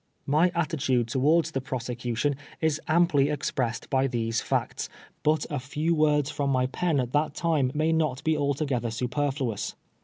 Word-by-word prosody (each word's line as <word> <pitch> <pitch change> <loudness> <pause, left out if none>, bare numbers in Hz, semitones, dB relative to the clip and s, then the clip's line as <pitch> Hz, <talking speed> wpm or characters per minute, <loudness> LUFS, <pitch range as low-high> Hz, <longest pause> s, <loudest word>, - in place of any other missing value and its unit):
My 155 +5 +3
attitude 135 -8 0
towards 150 +6 +3
the 135 - -2
prosecution 125 +1 -2 0.2
is 160 -2 0
amply 155 -4 +3
ex 150 -1 -2
pressed 115 -3 -2
by 135 0 +3
these 115 -2 -1
facts, - - -2 0.3
but 155 0 +2
a 145 - -1
few 150 +6 -1
words 150 -2 +2
from 140 -1 -1
my 130 -2 +2
pen 155 +3 0
at 125 -1 -1
that 150 0 +1
time 155 -7 +1
may 155 +2 +2
not 155 -5 0
be 160 0 +2
altogether 140 -4 0
superfluous. 125 -1 -2
140 Hz, 160 wpm, -27 LUFS, 125-155 Hz, 0.3 s, My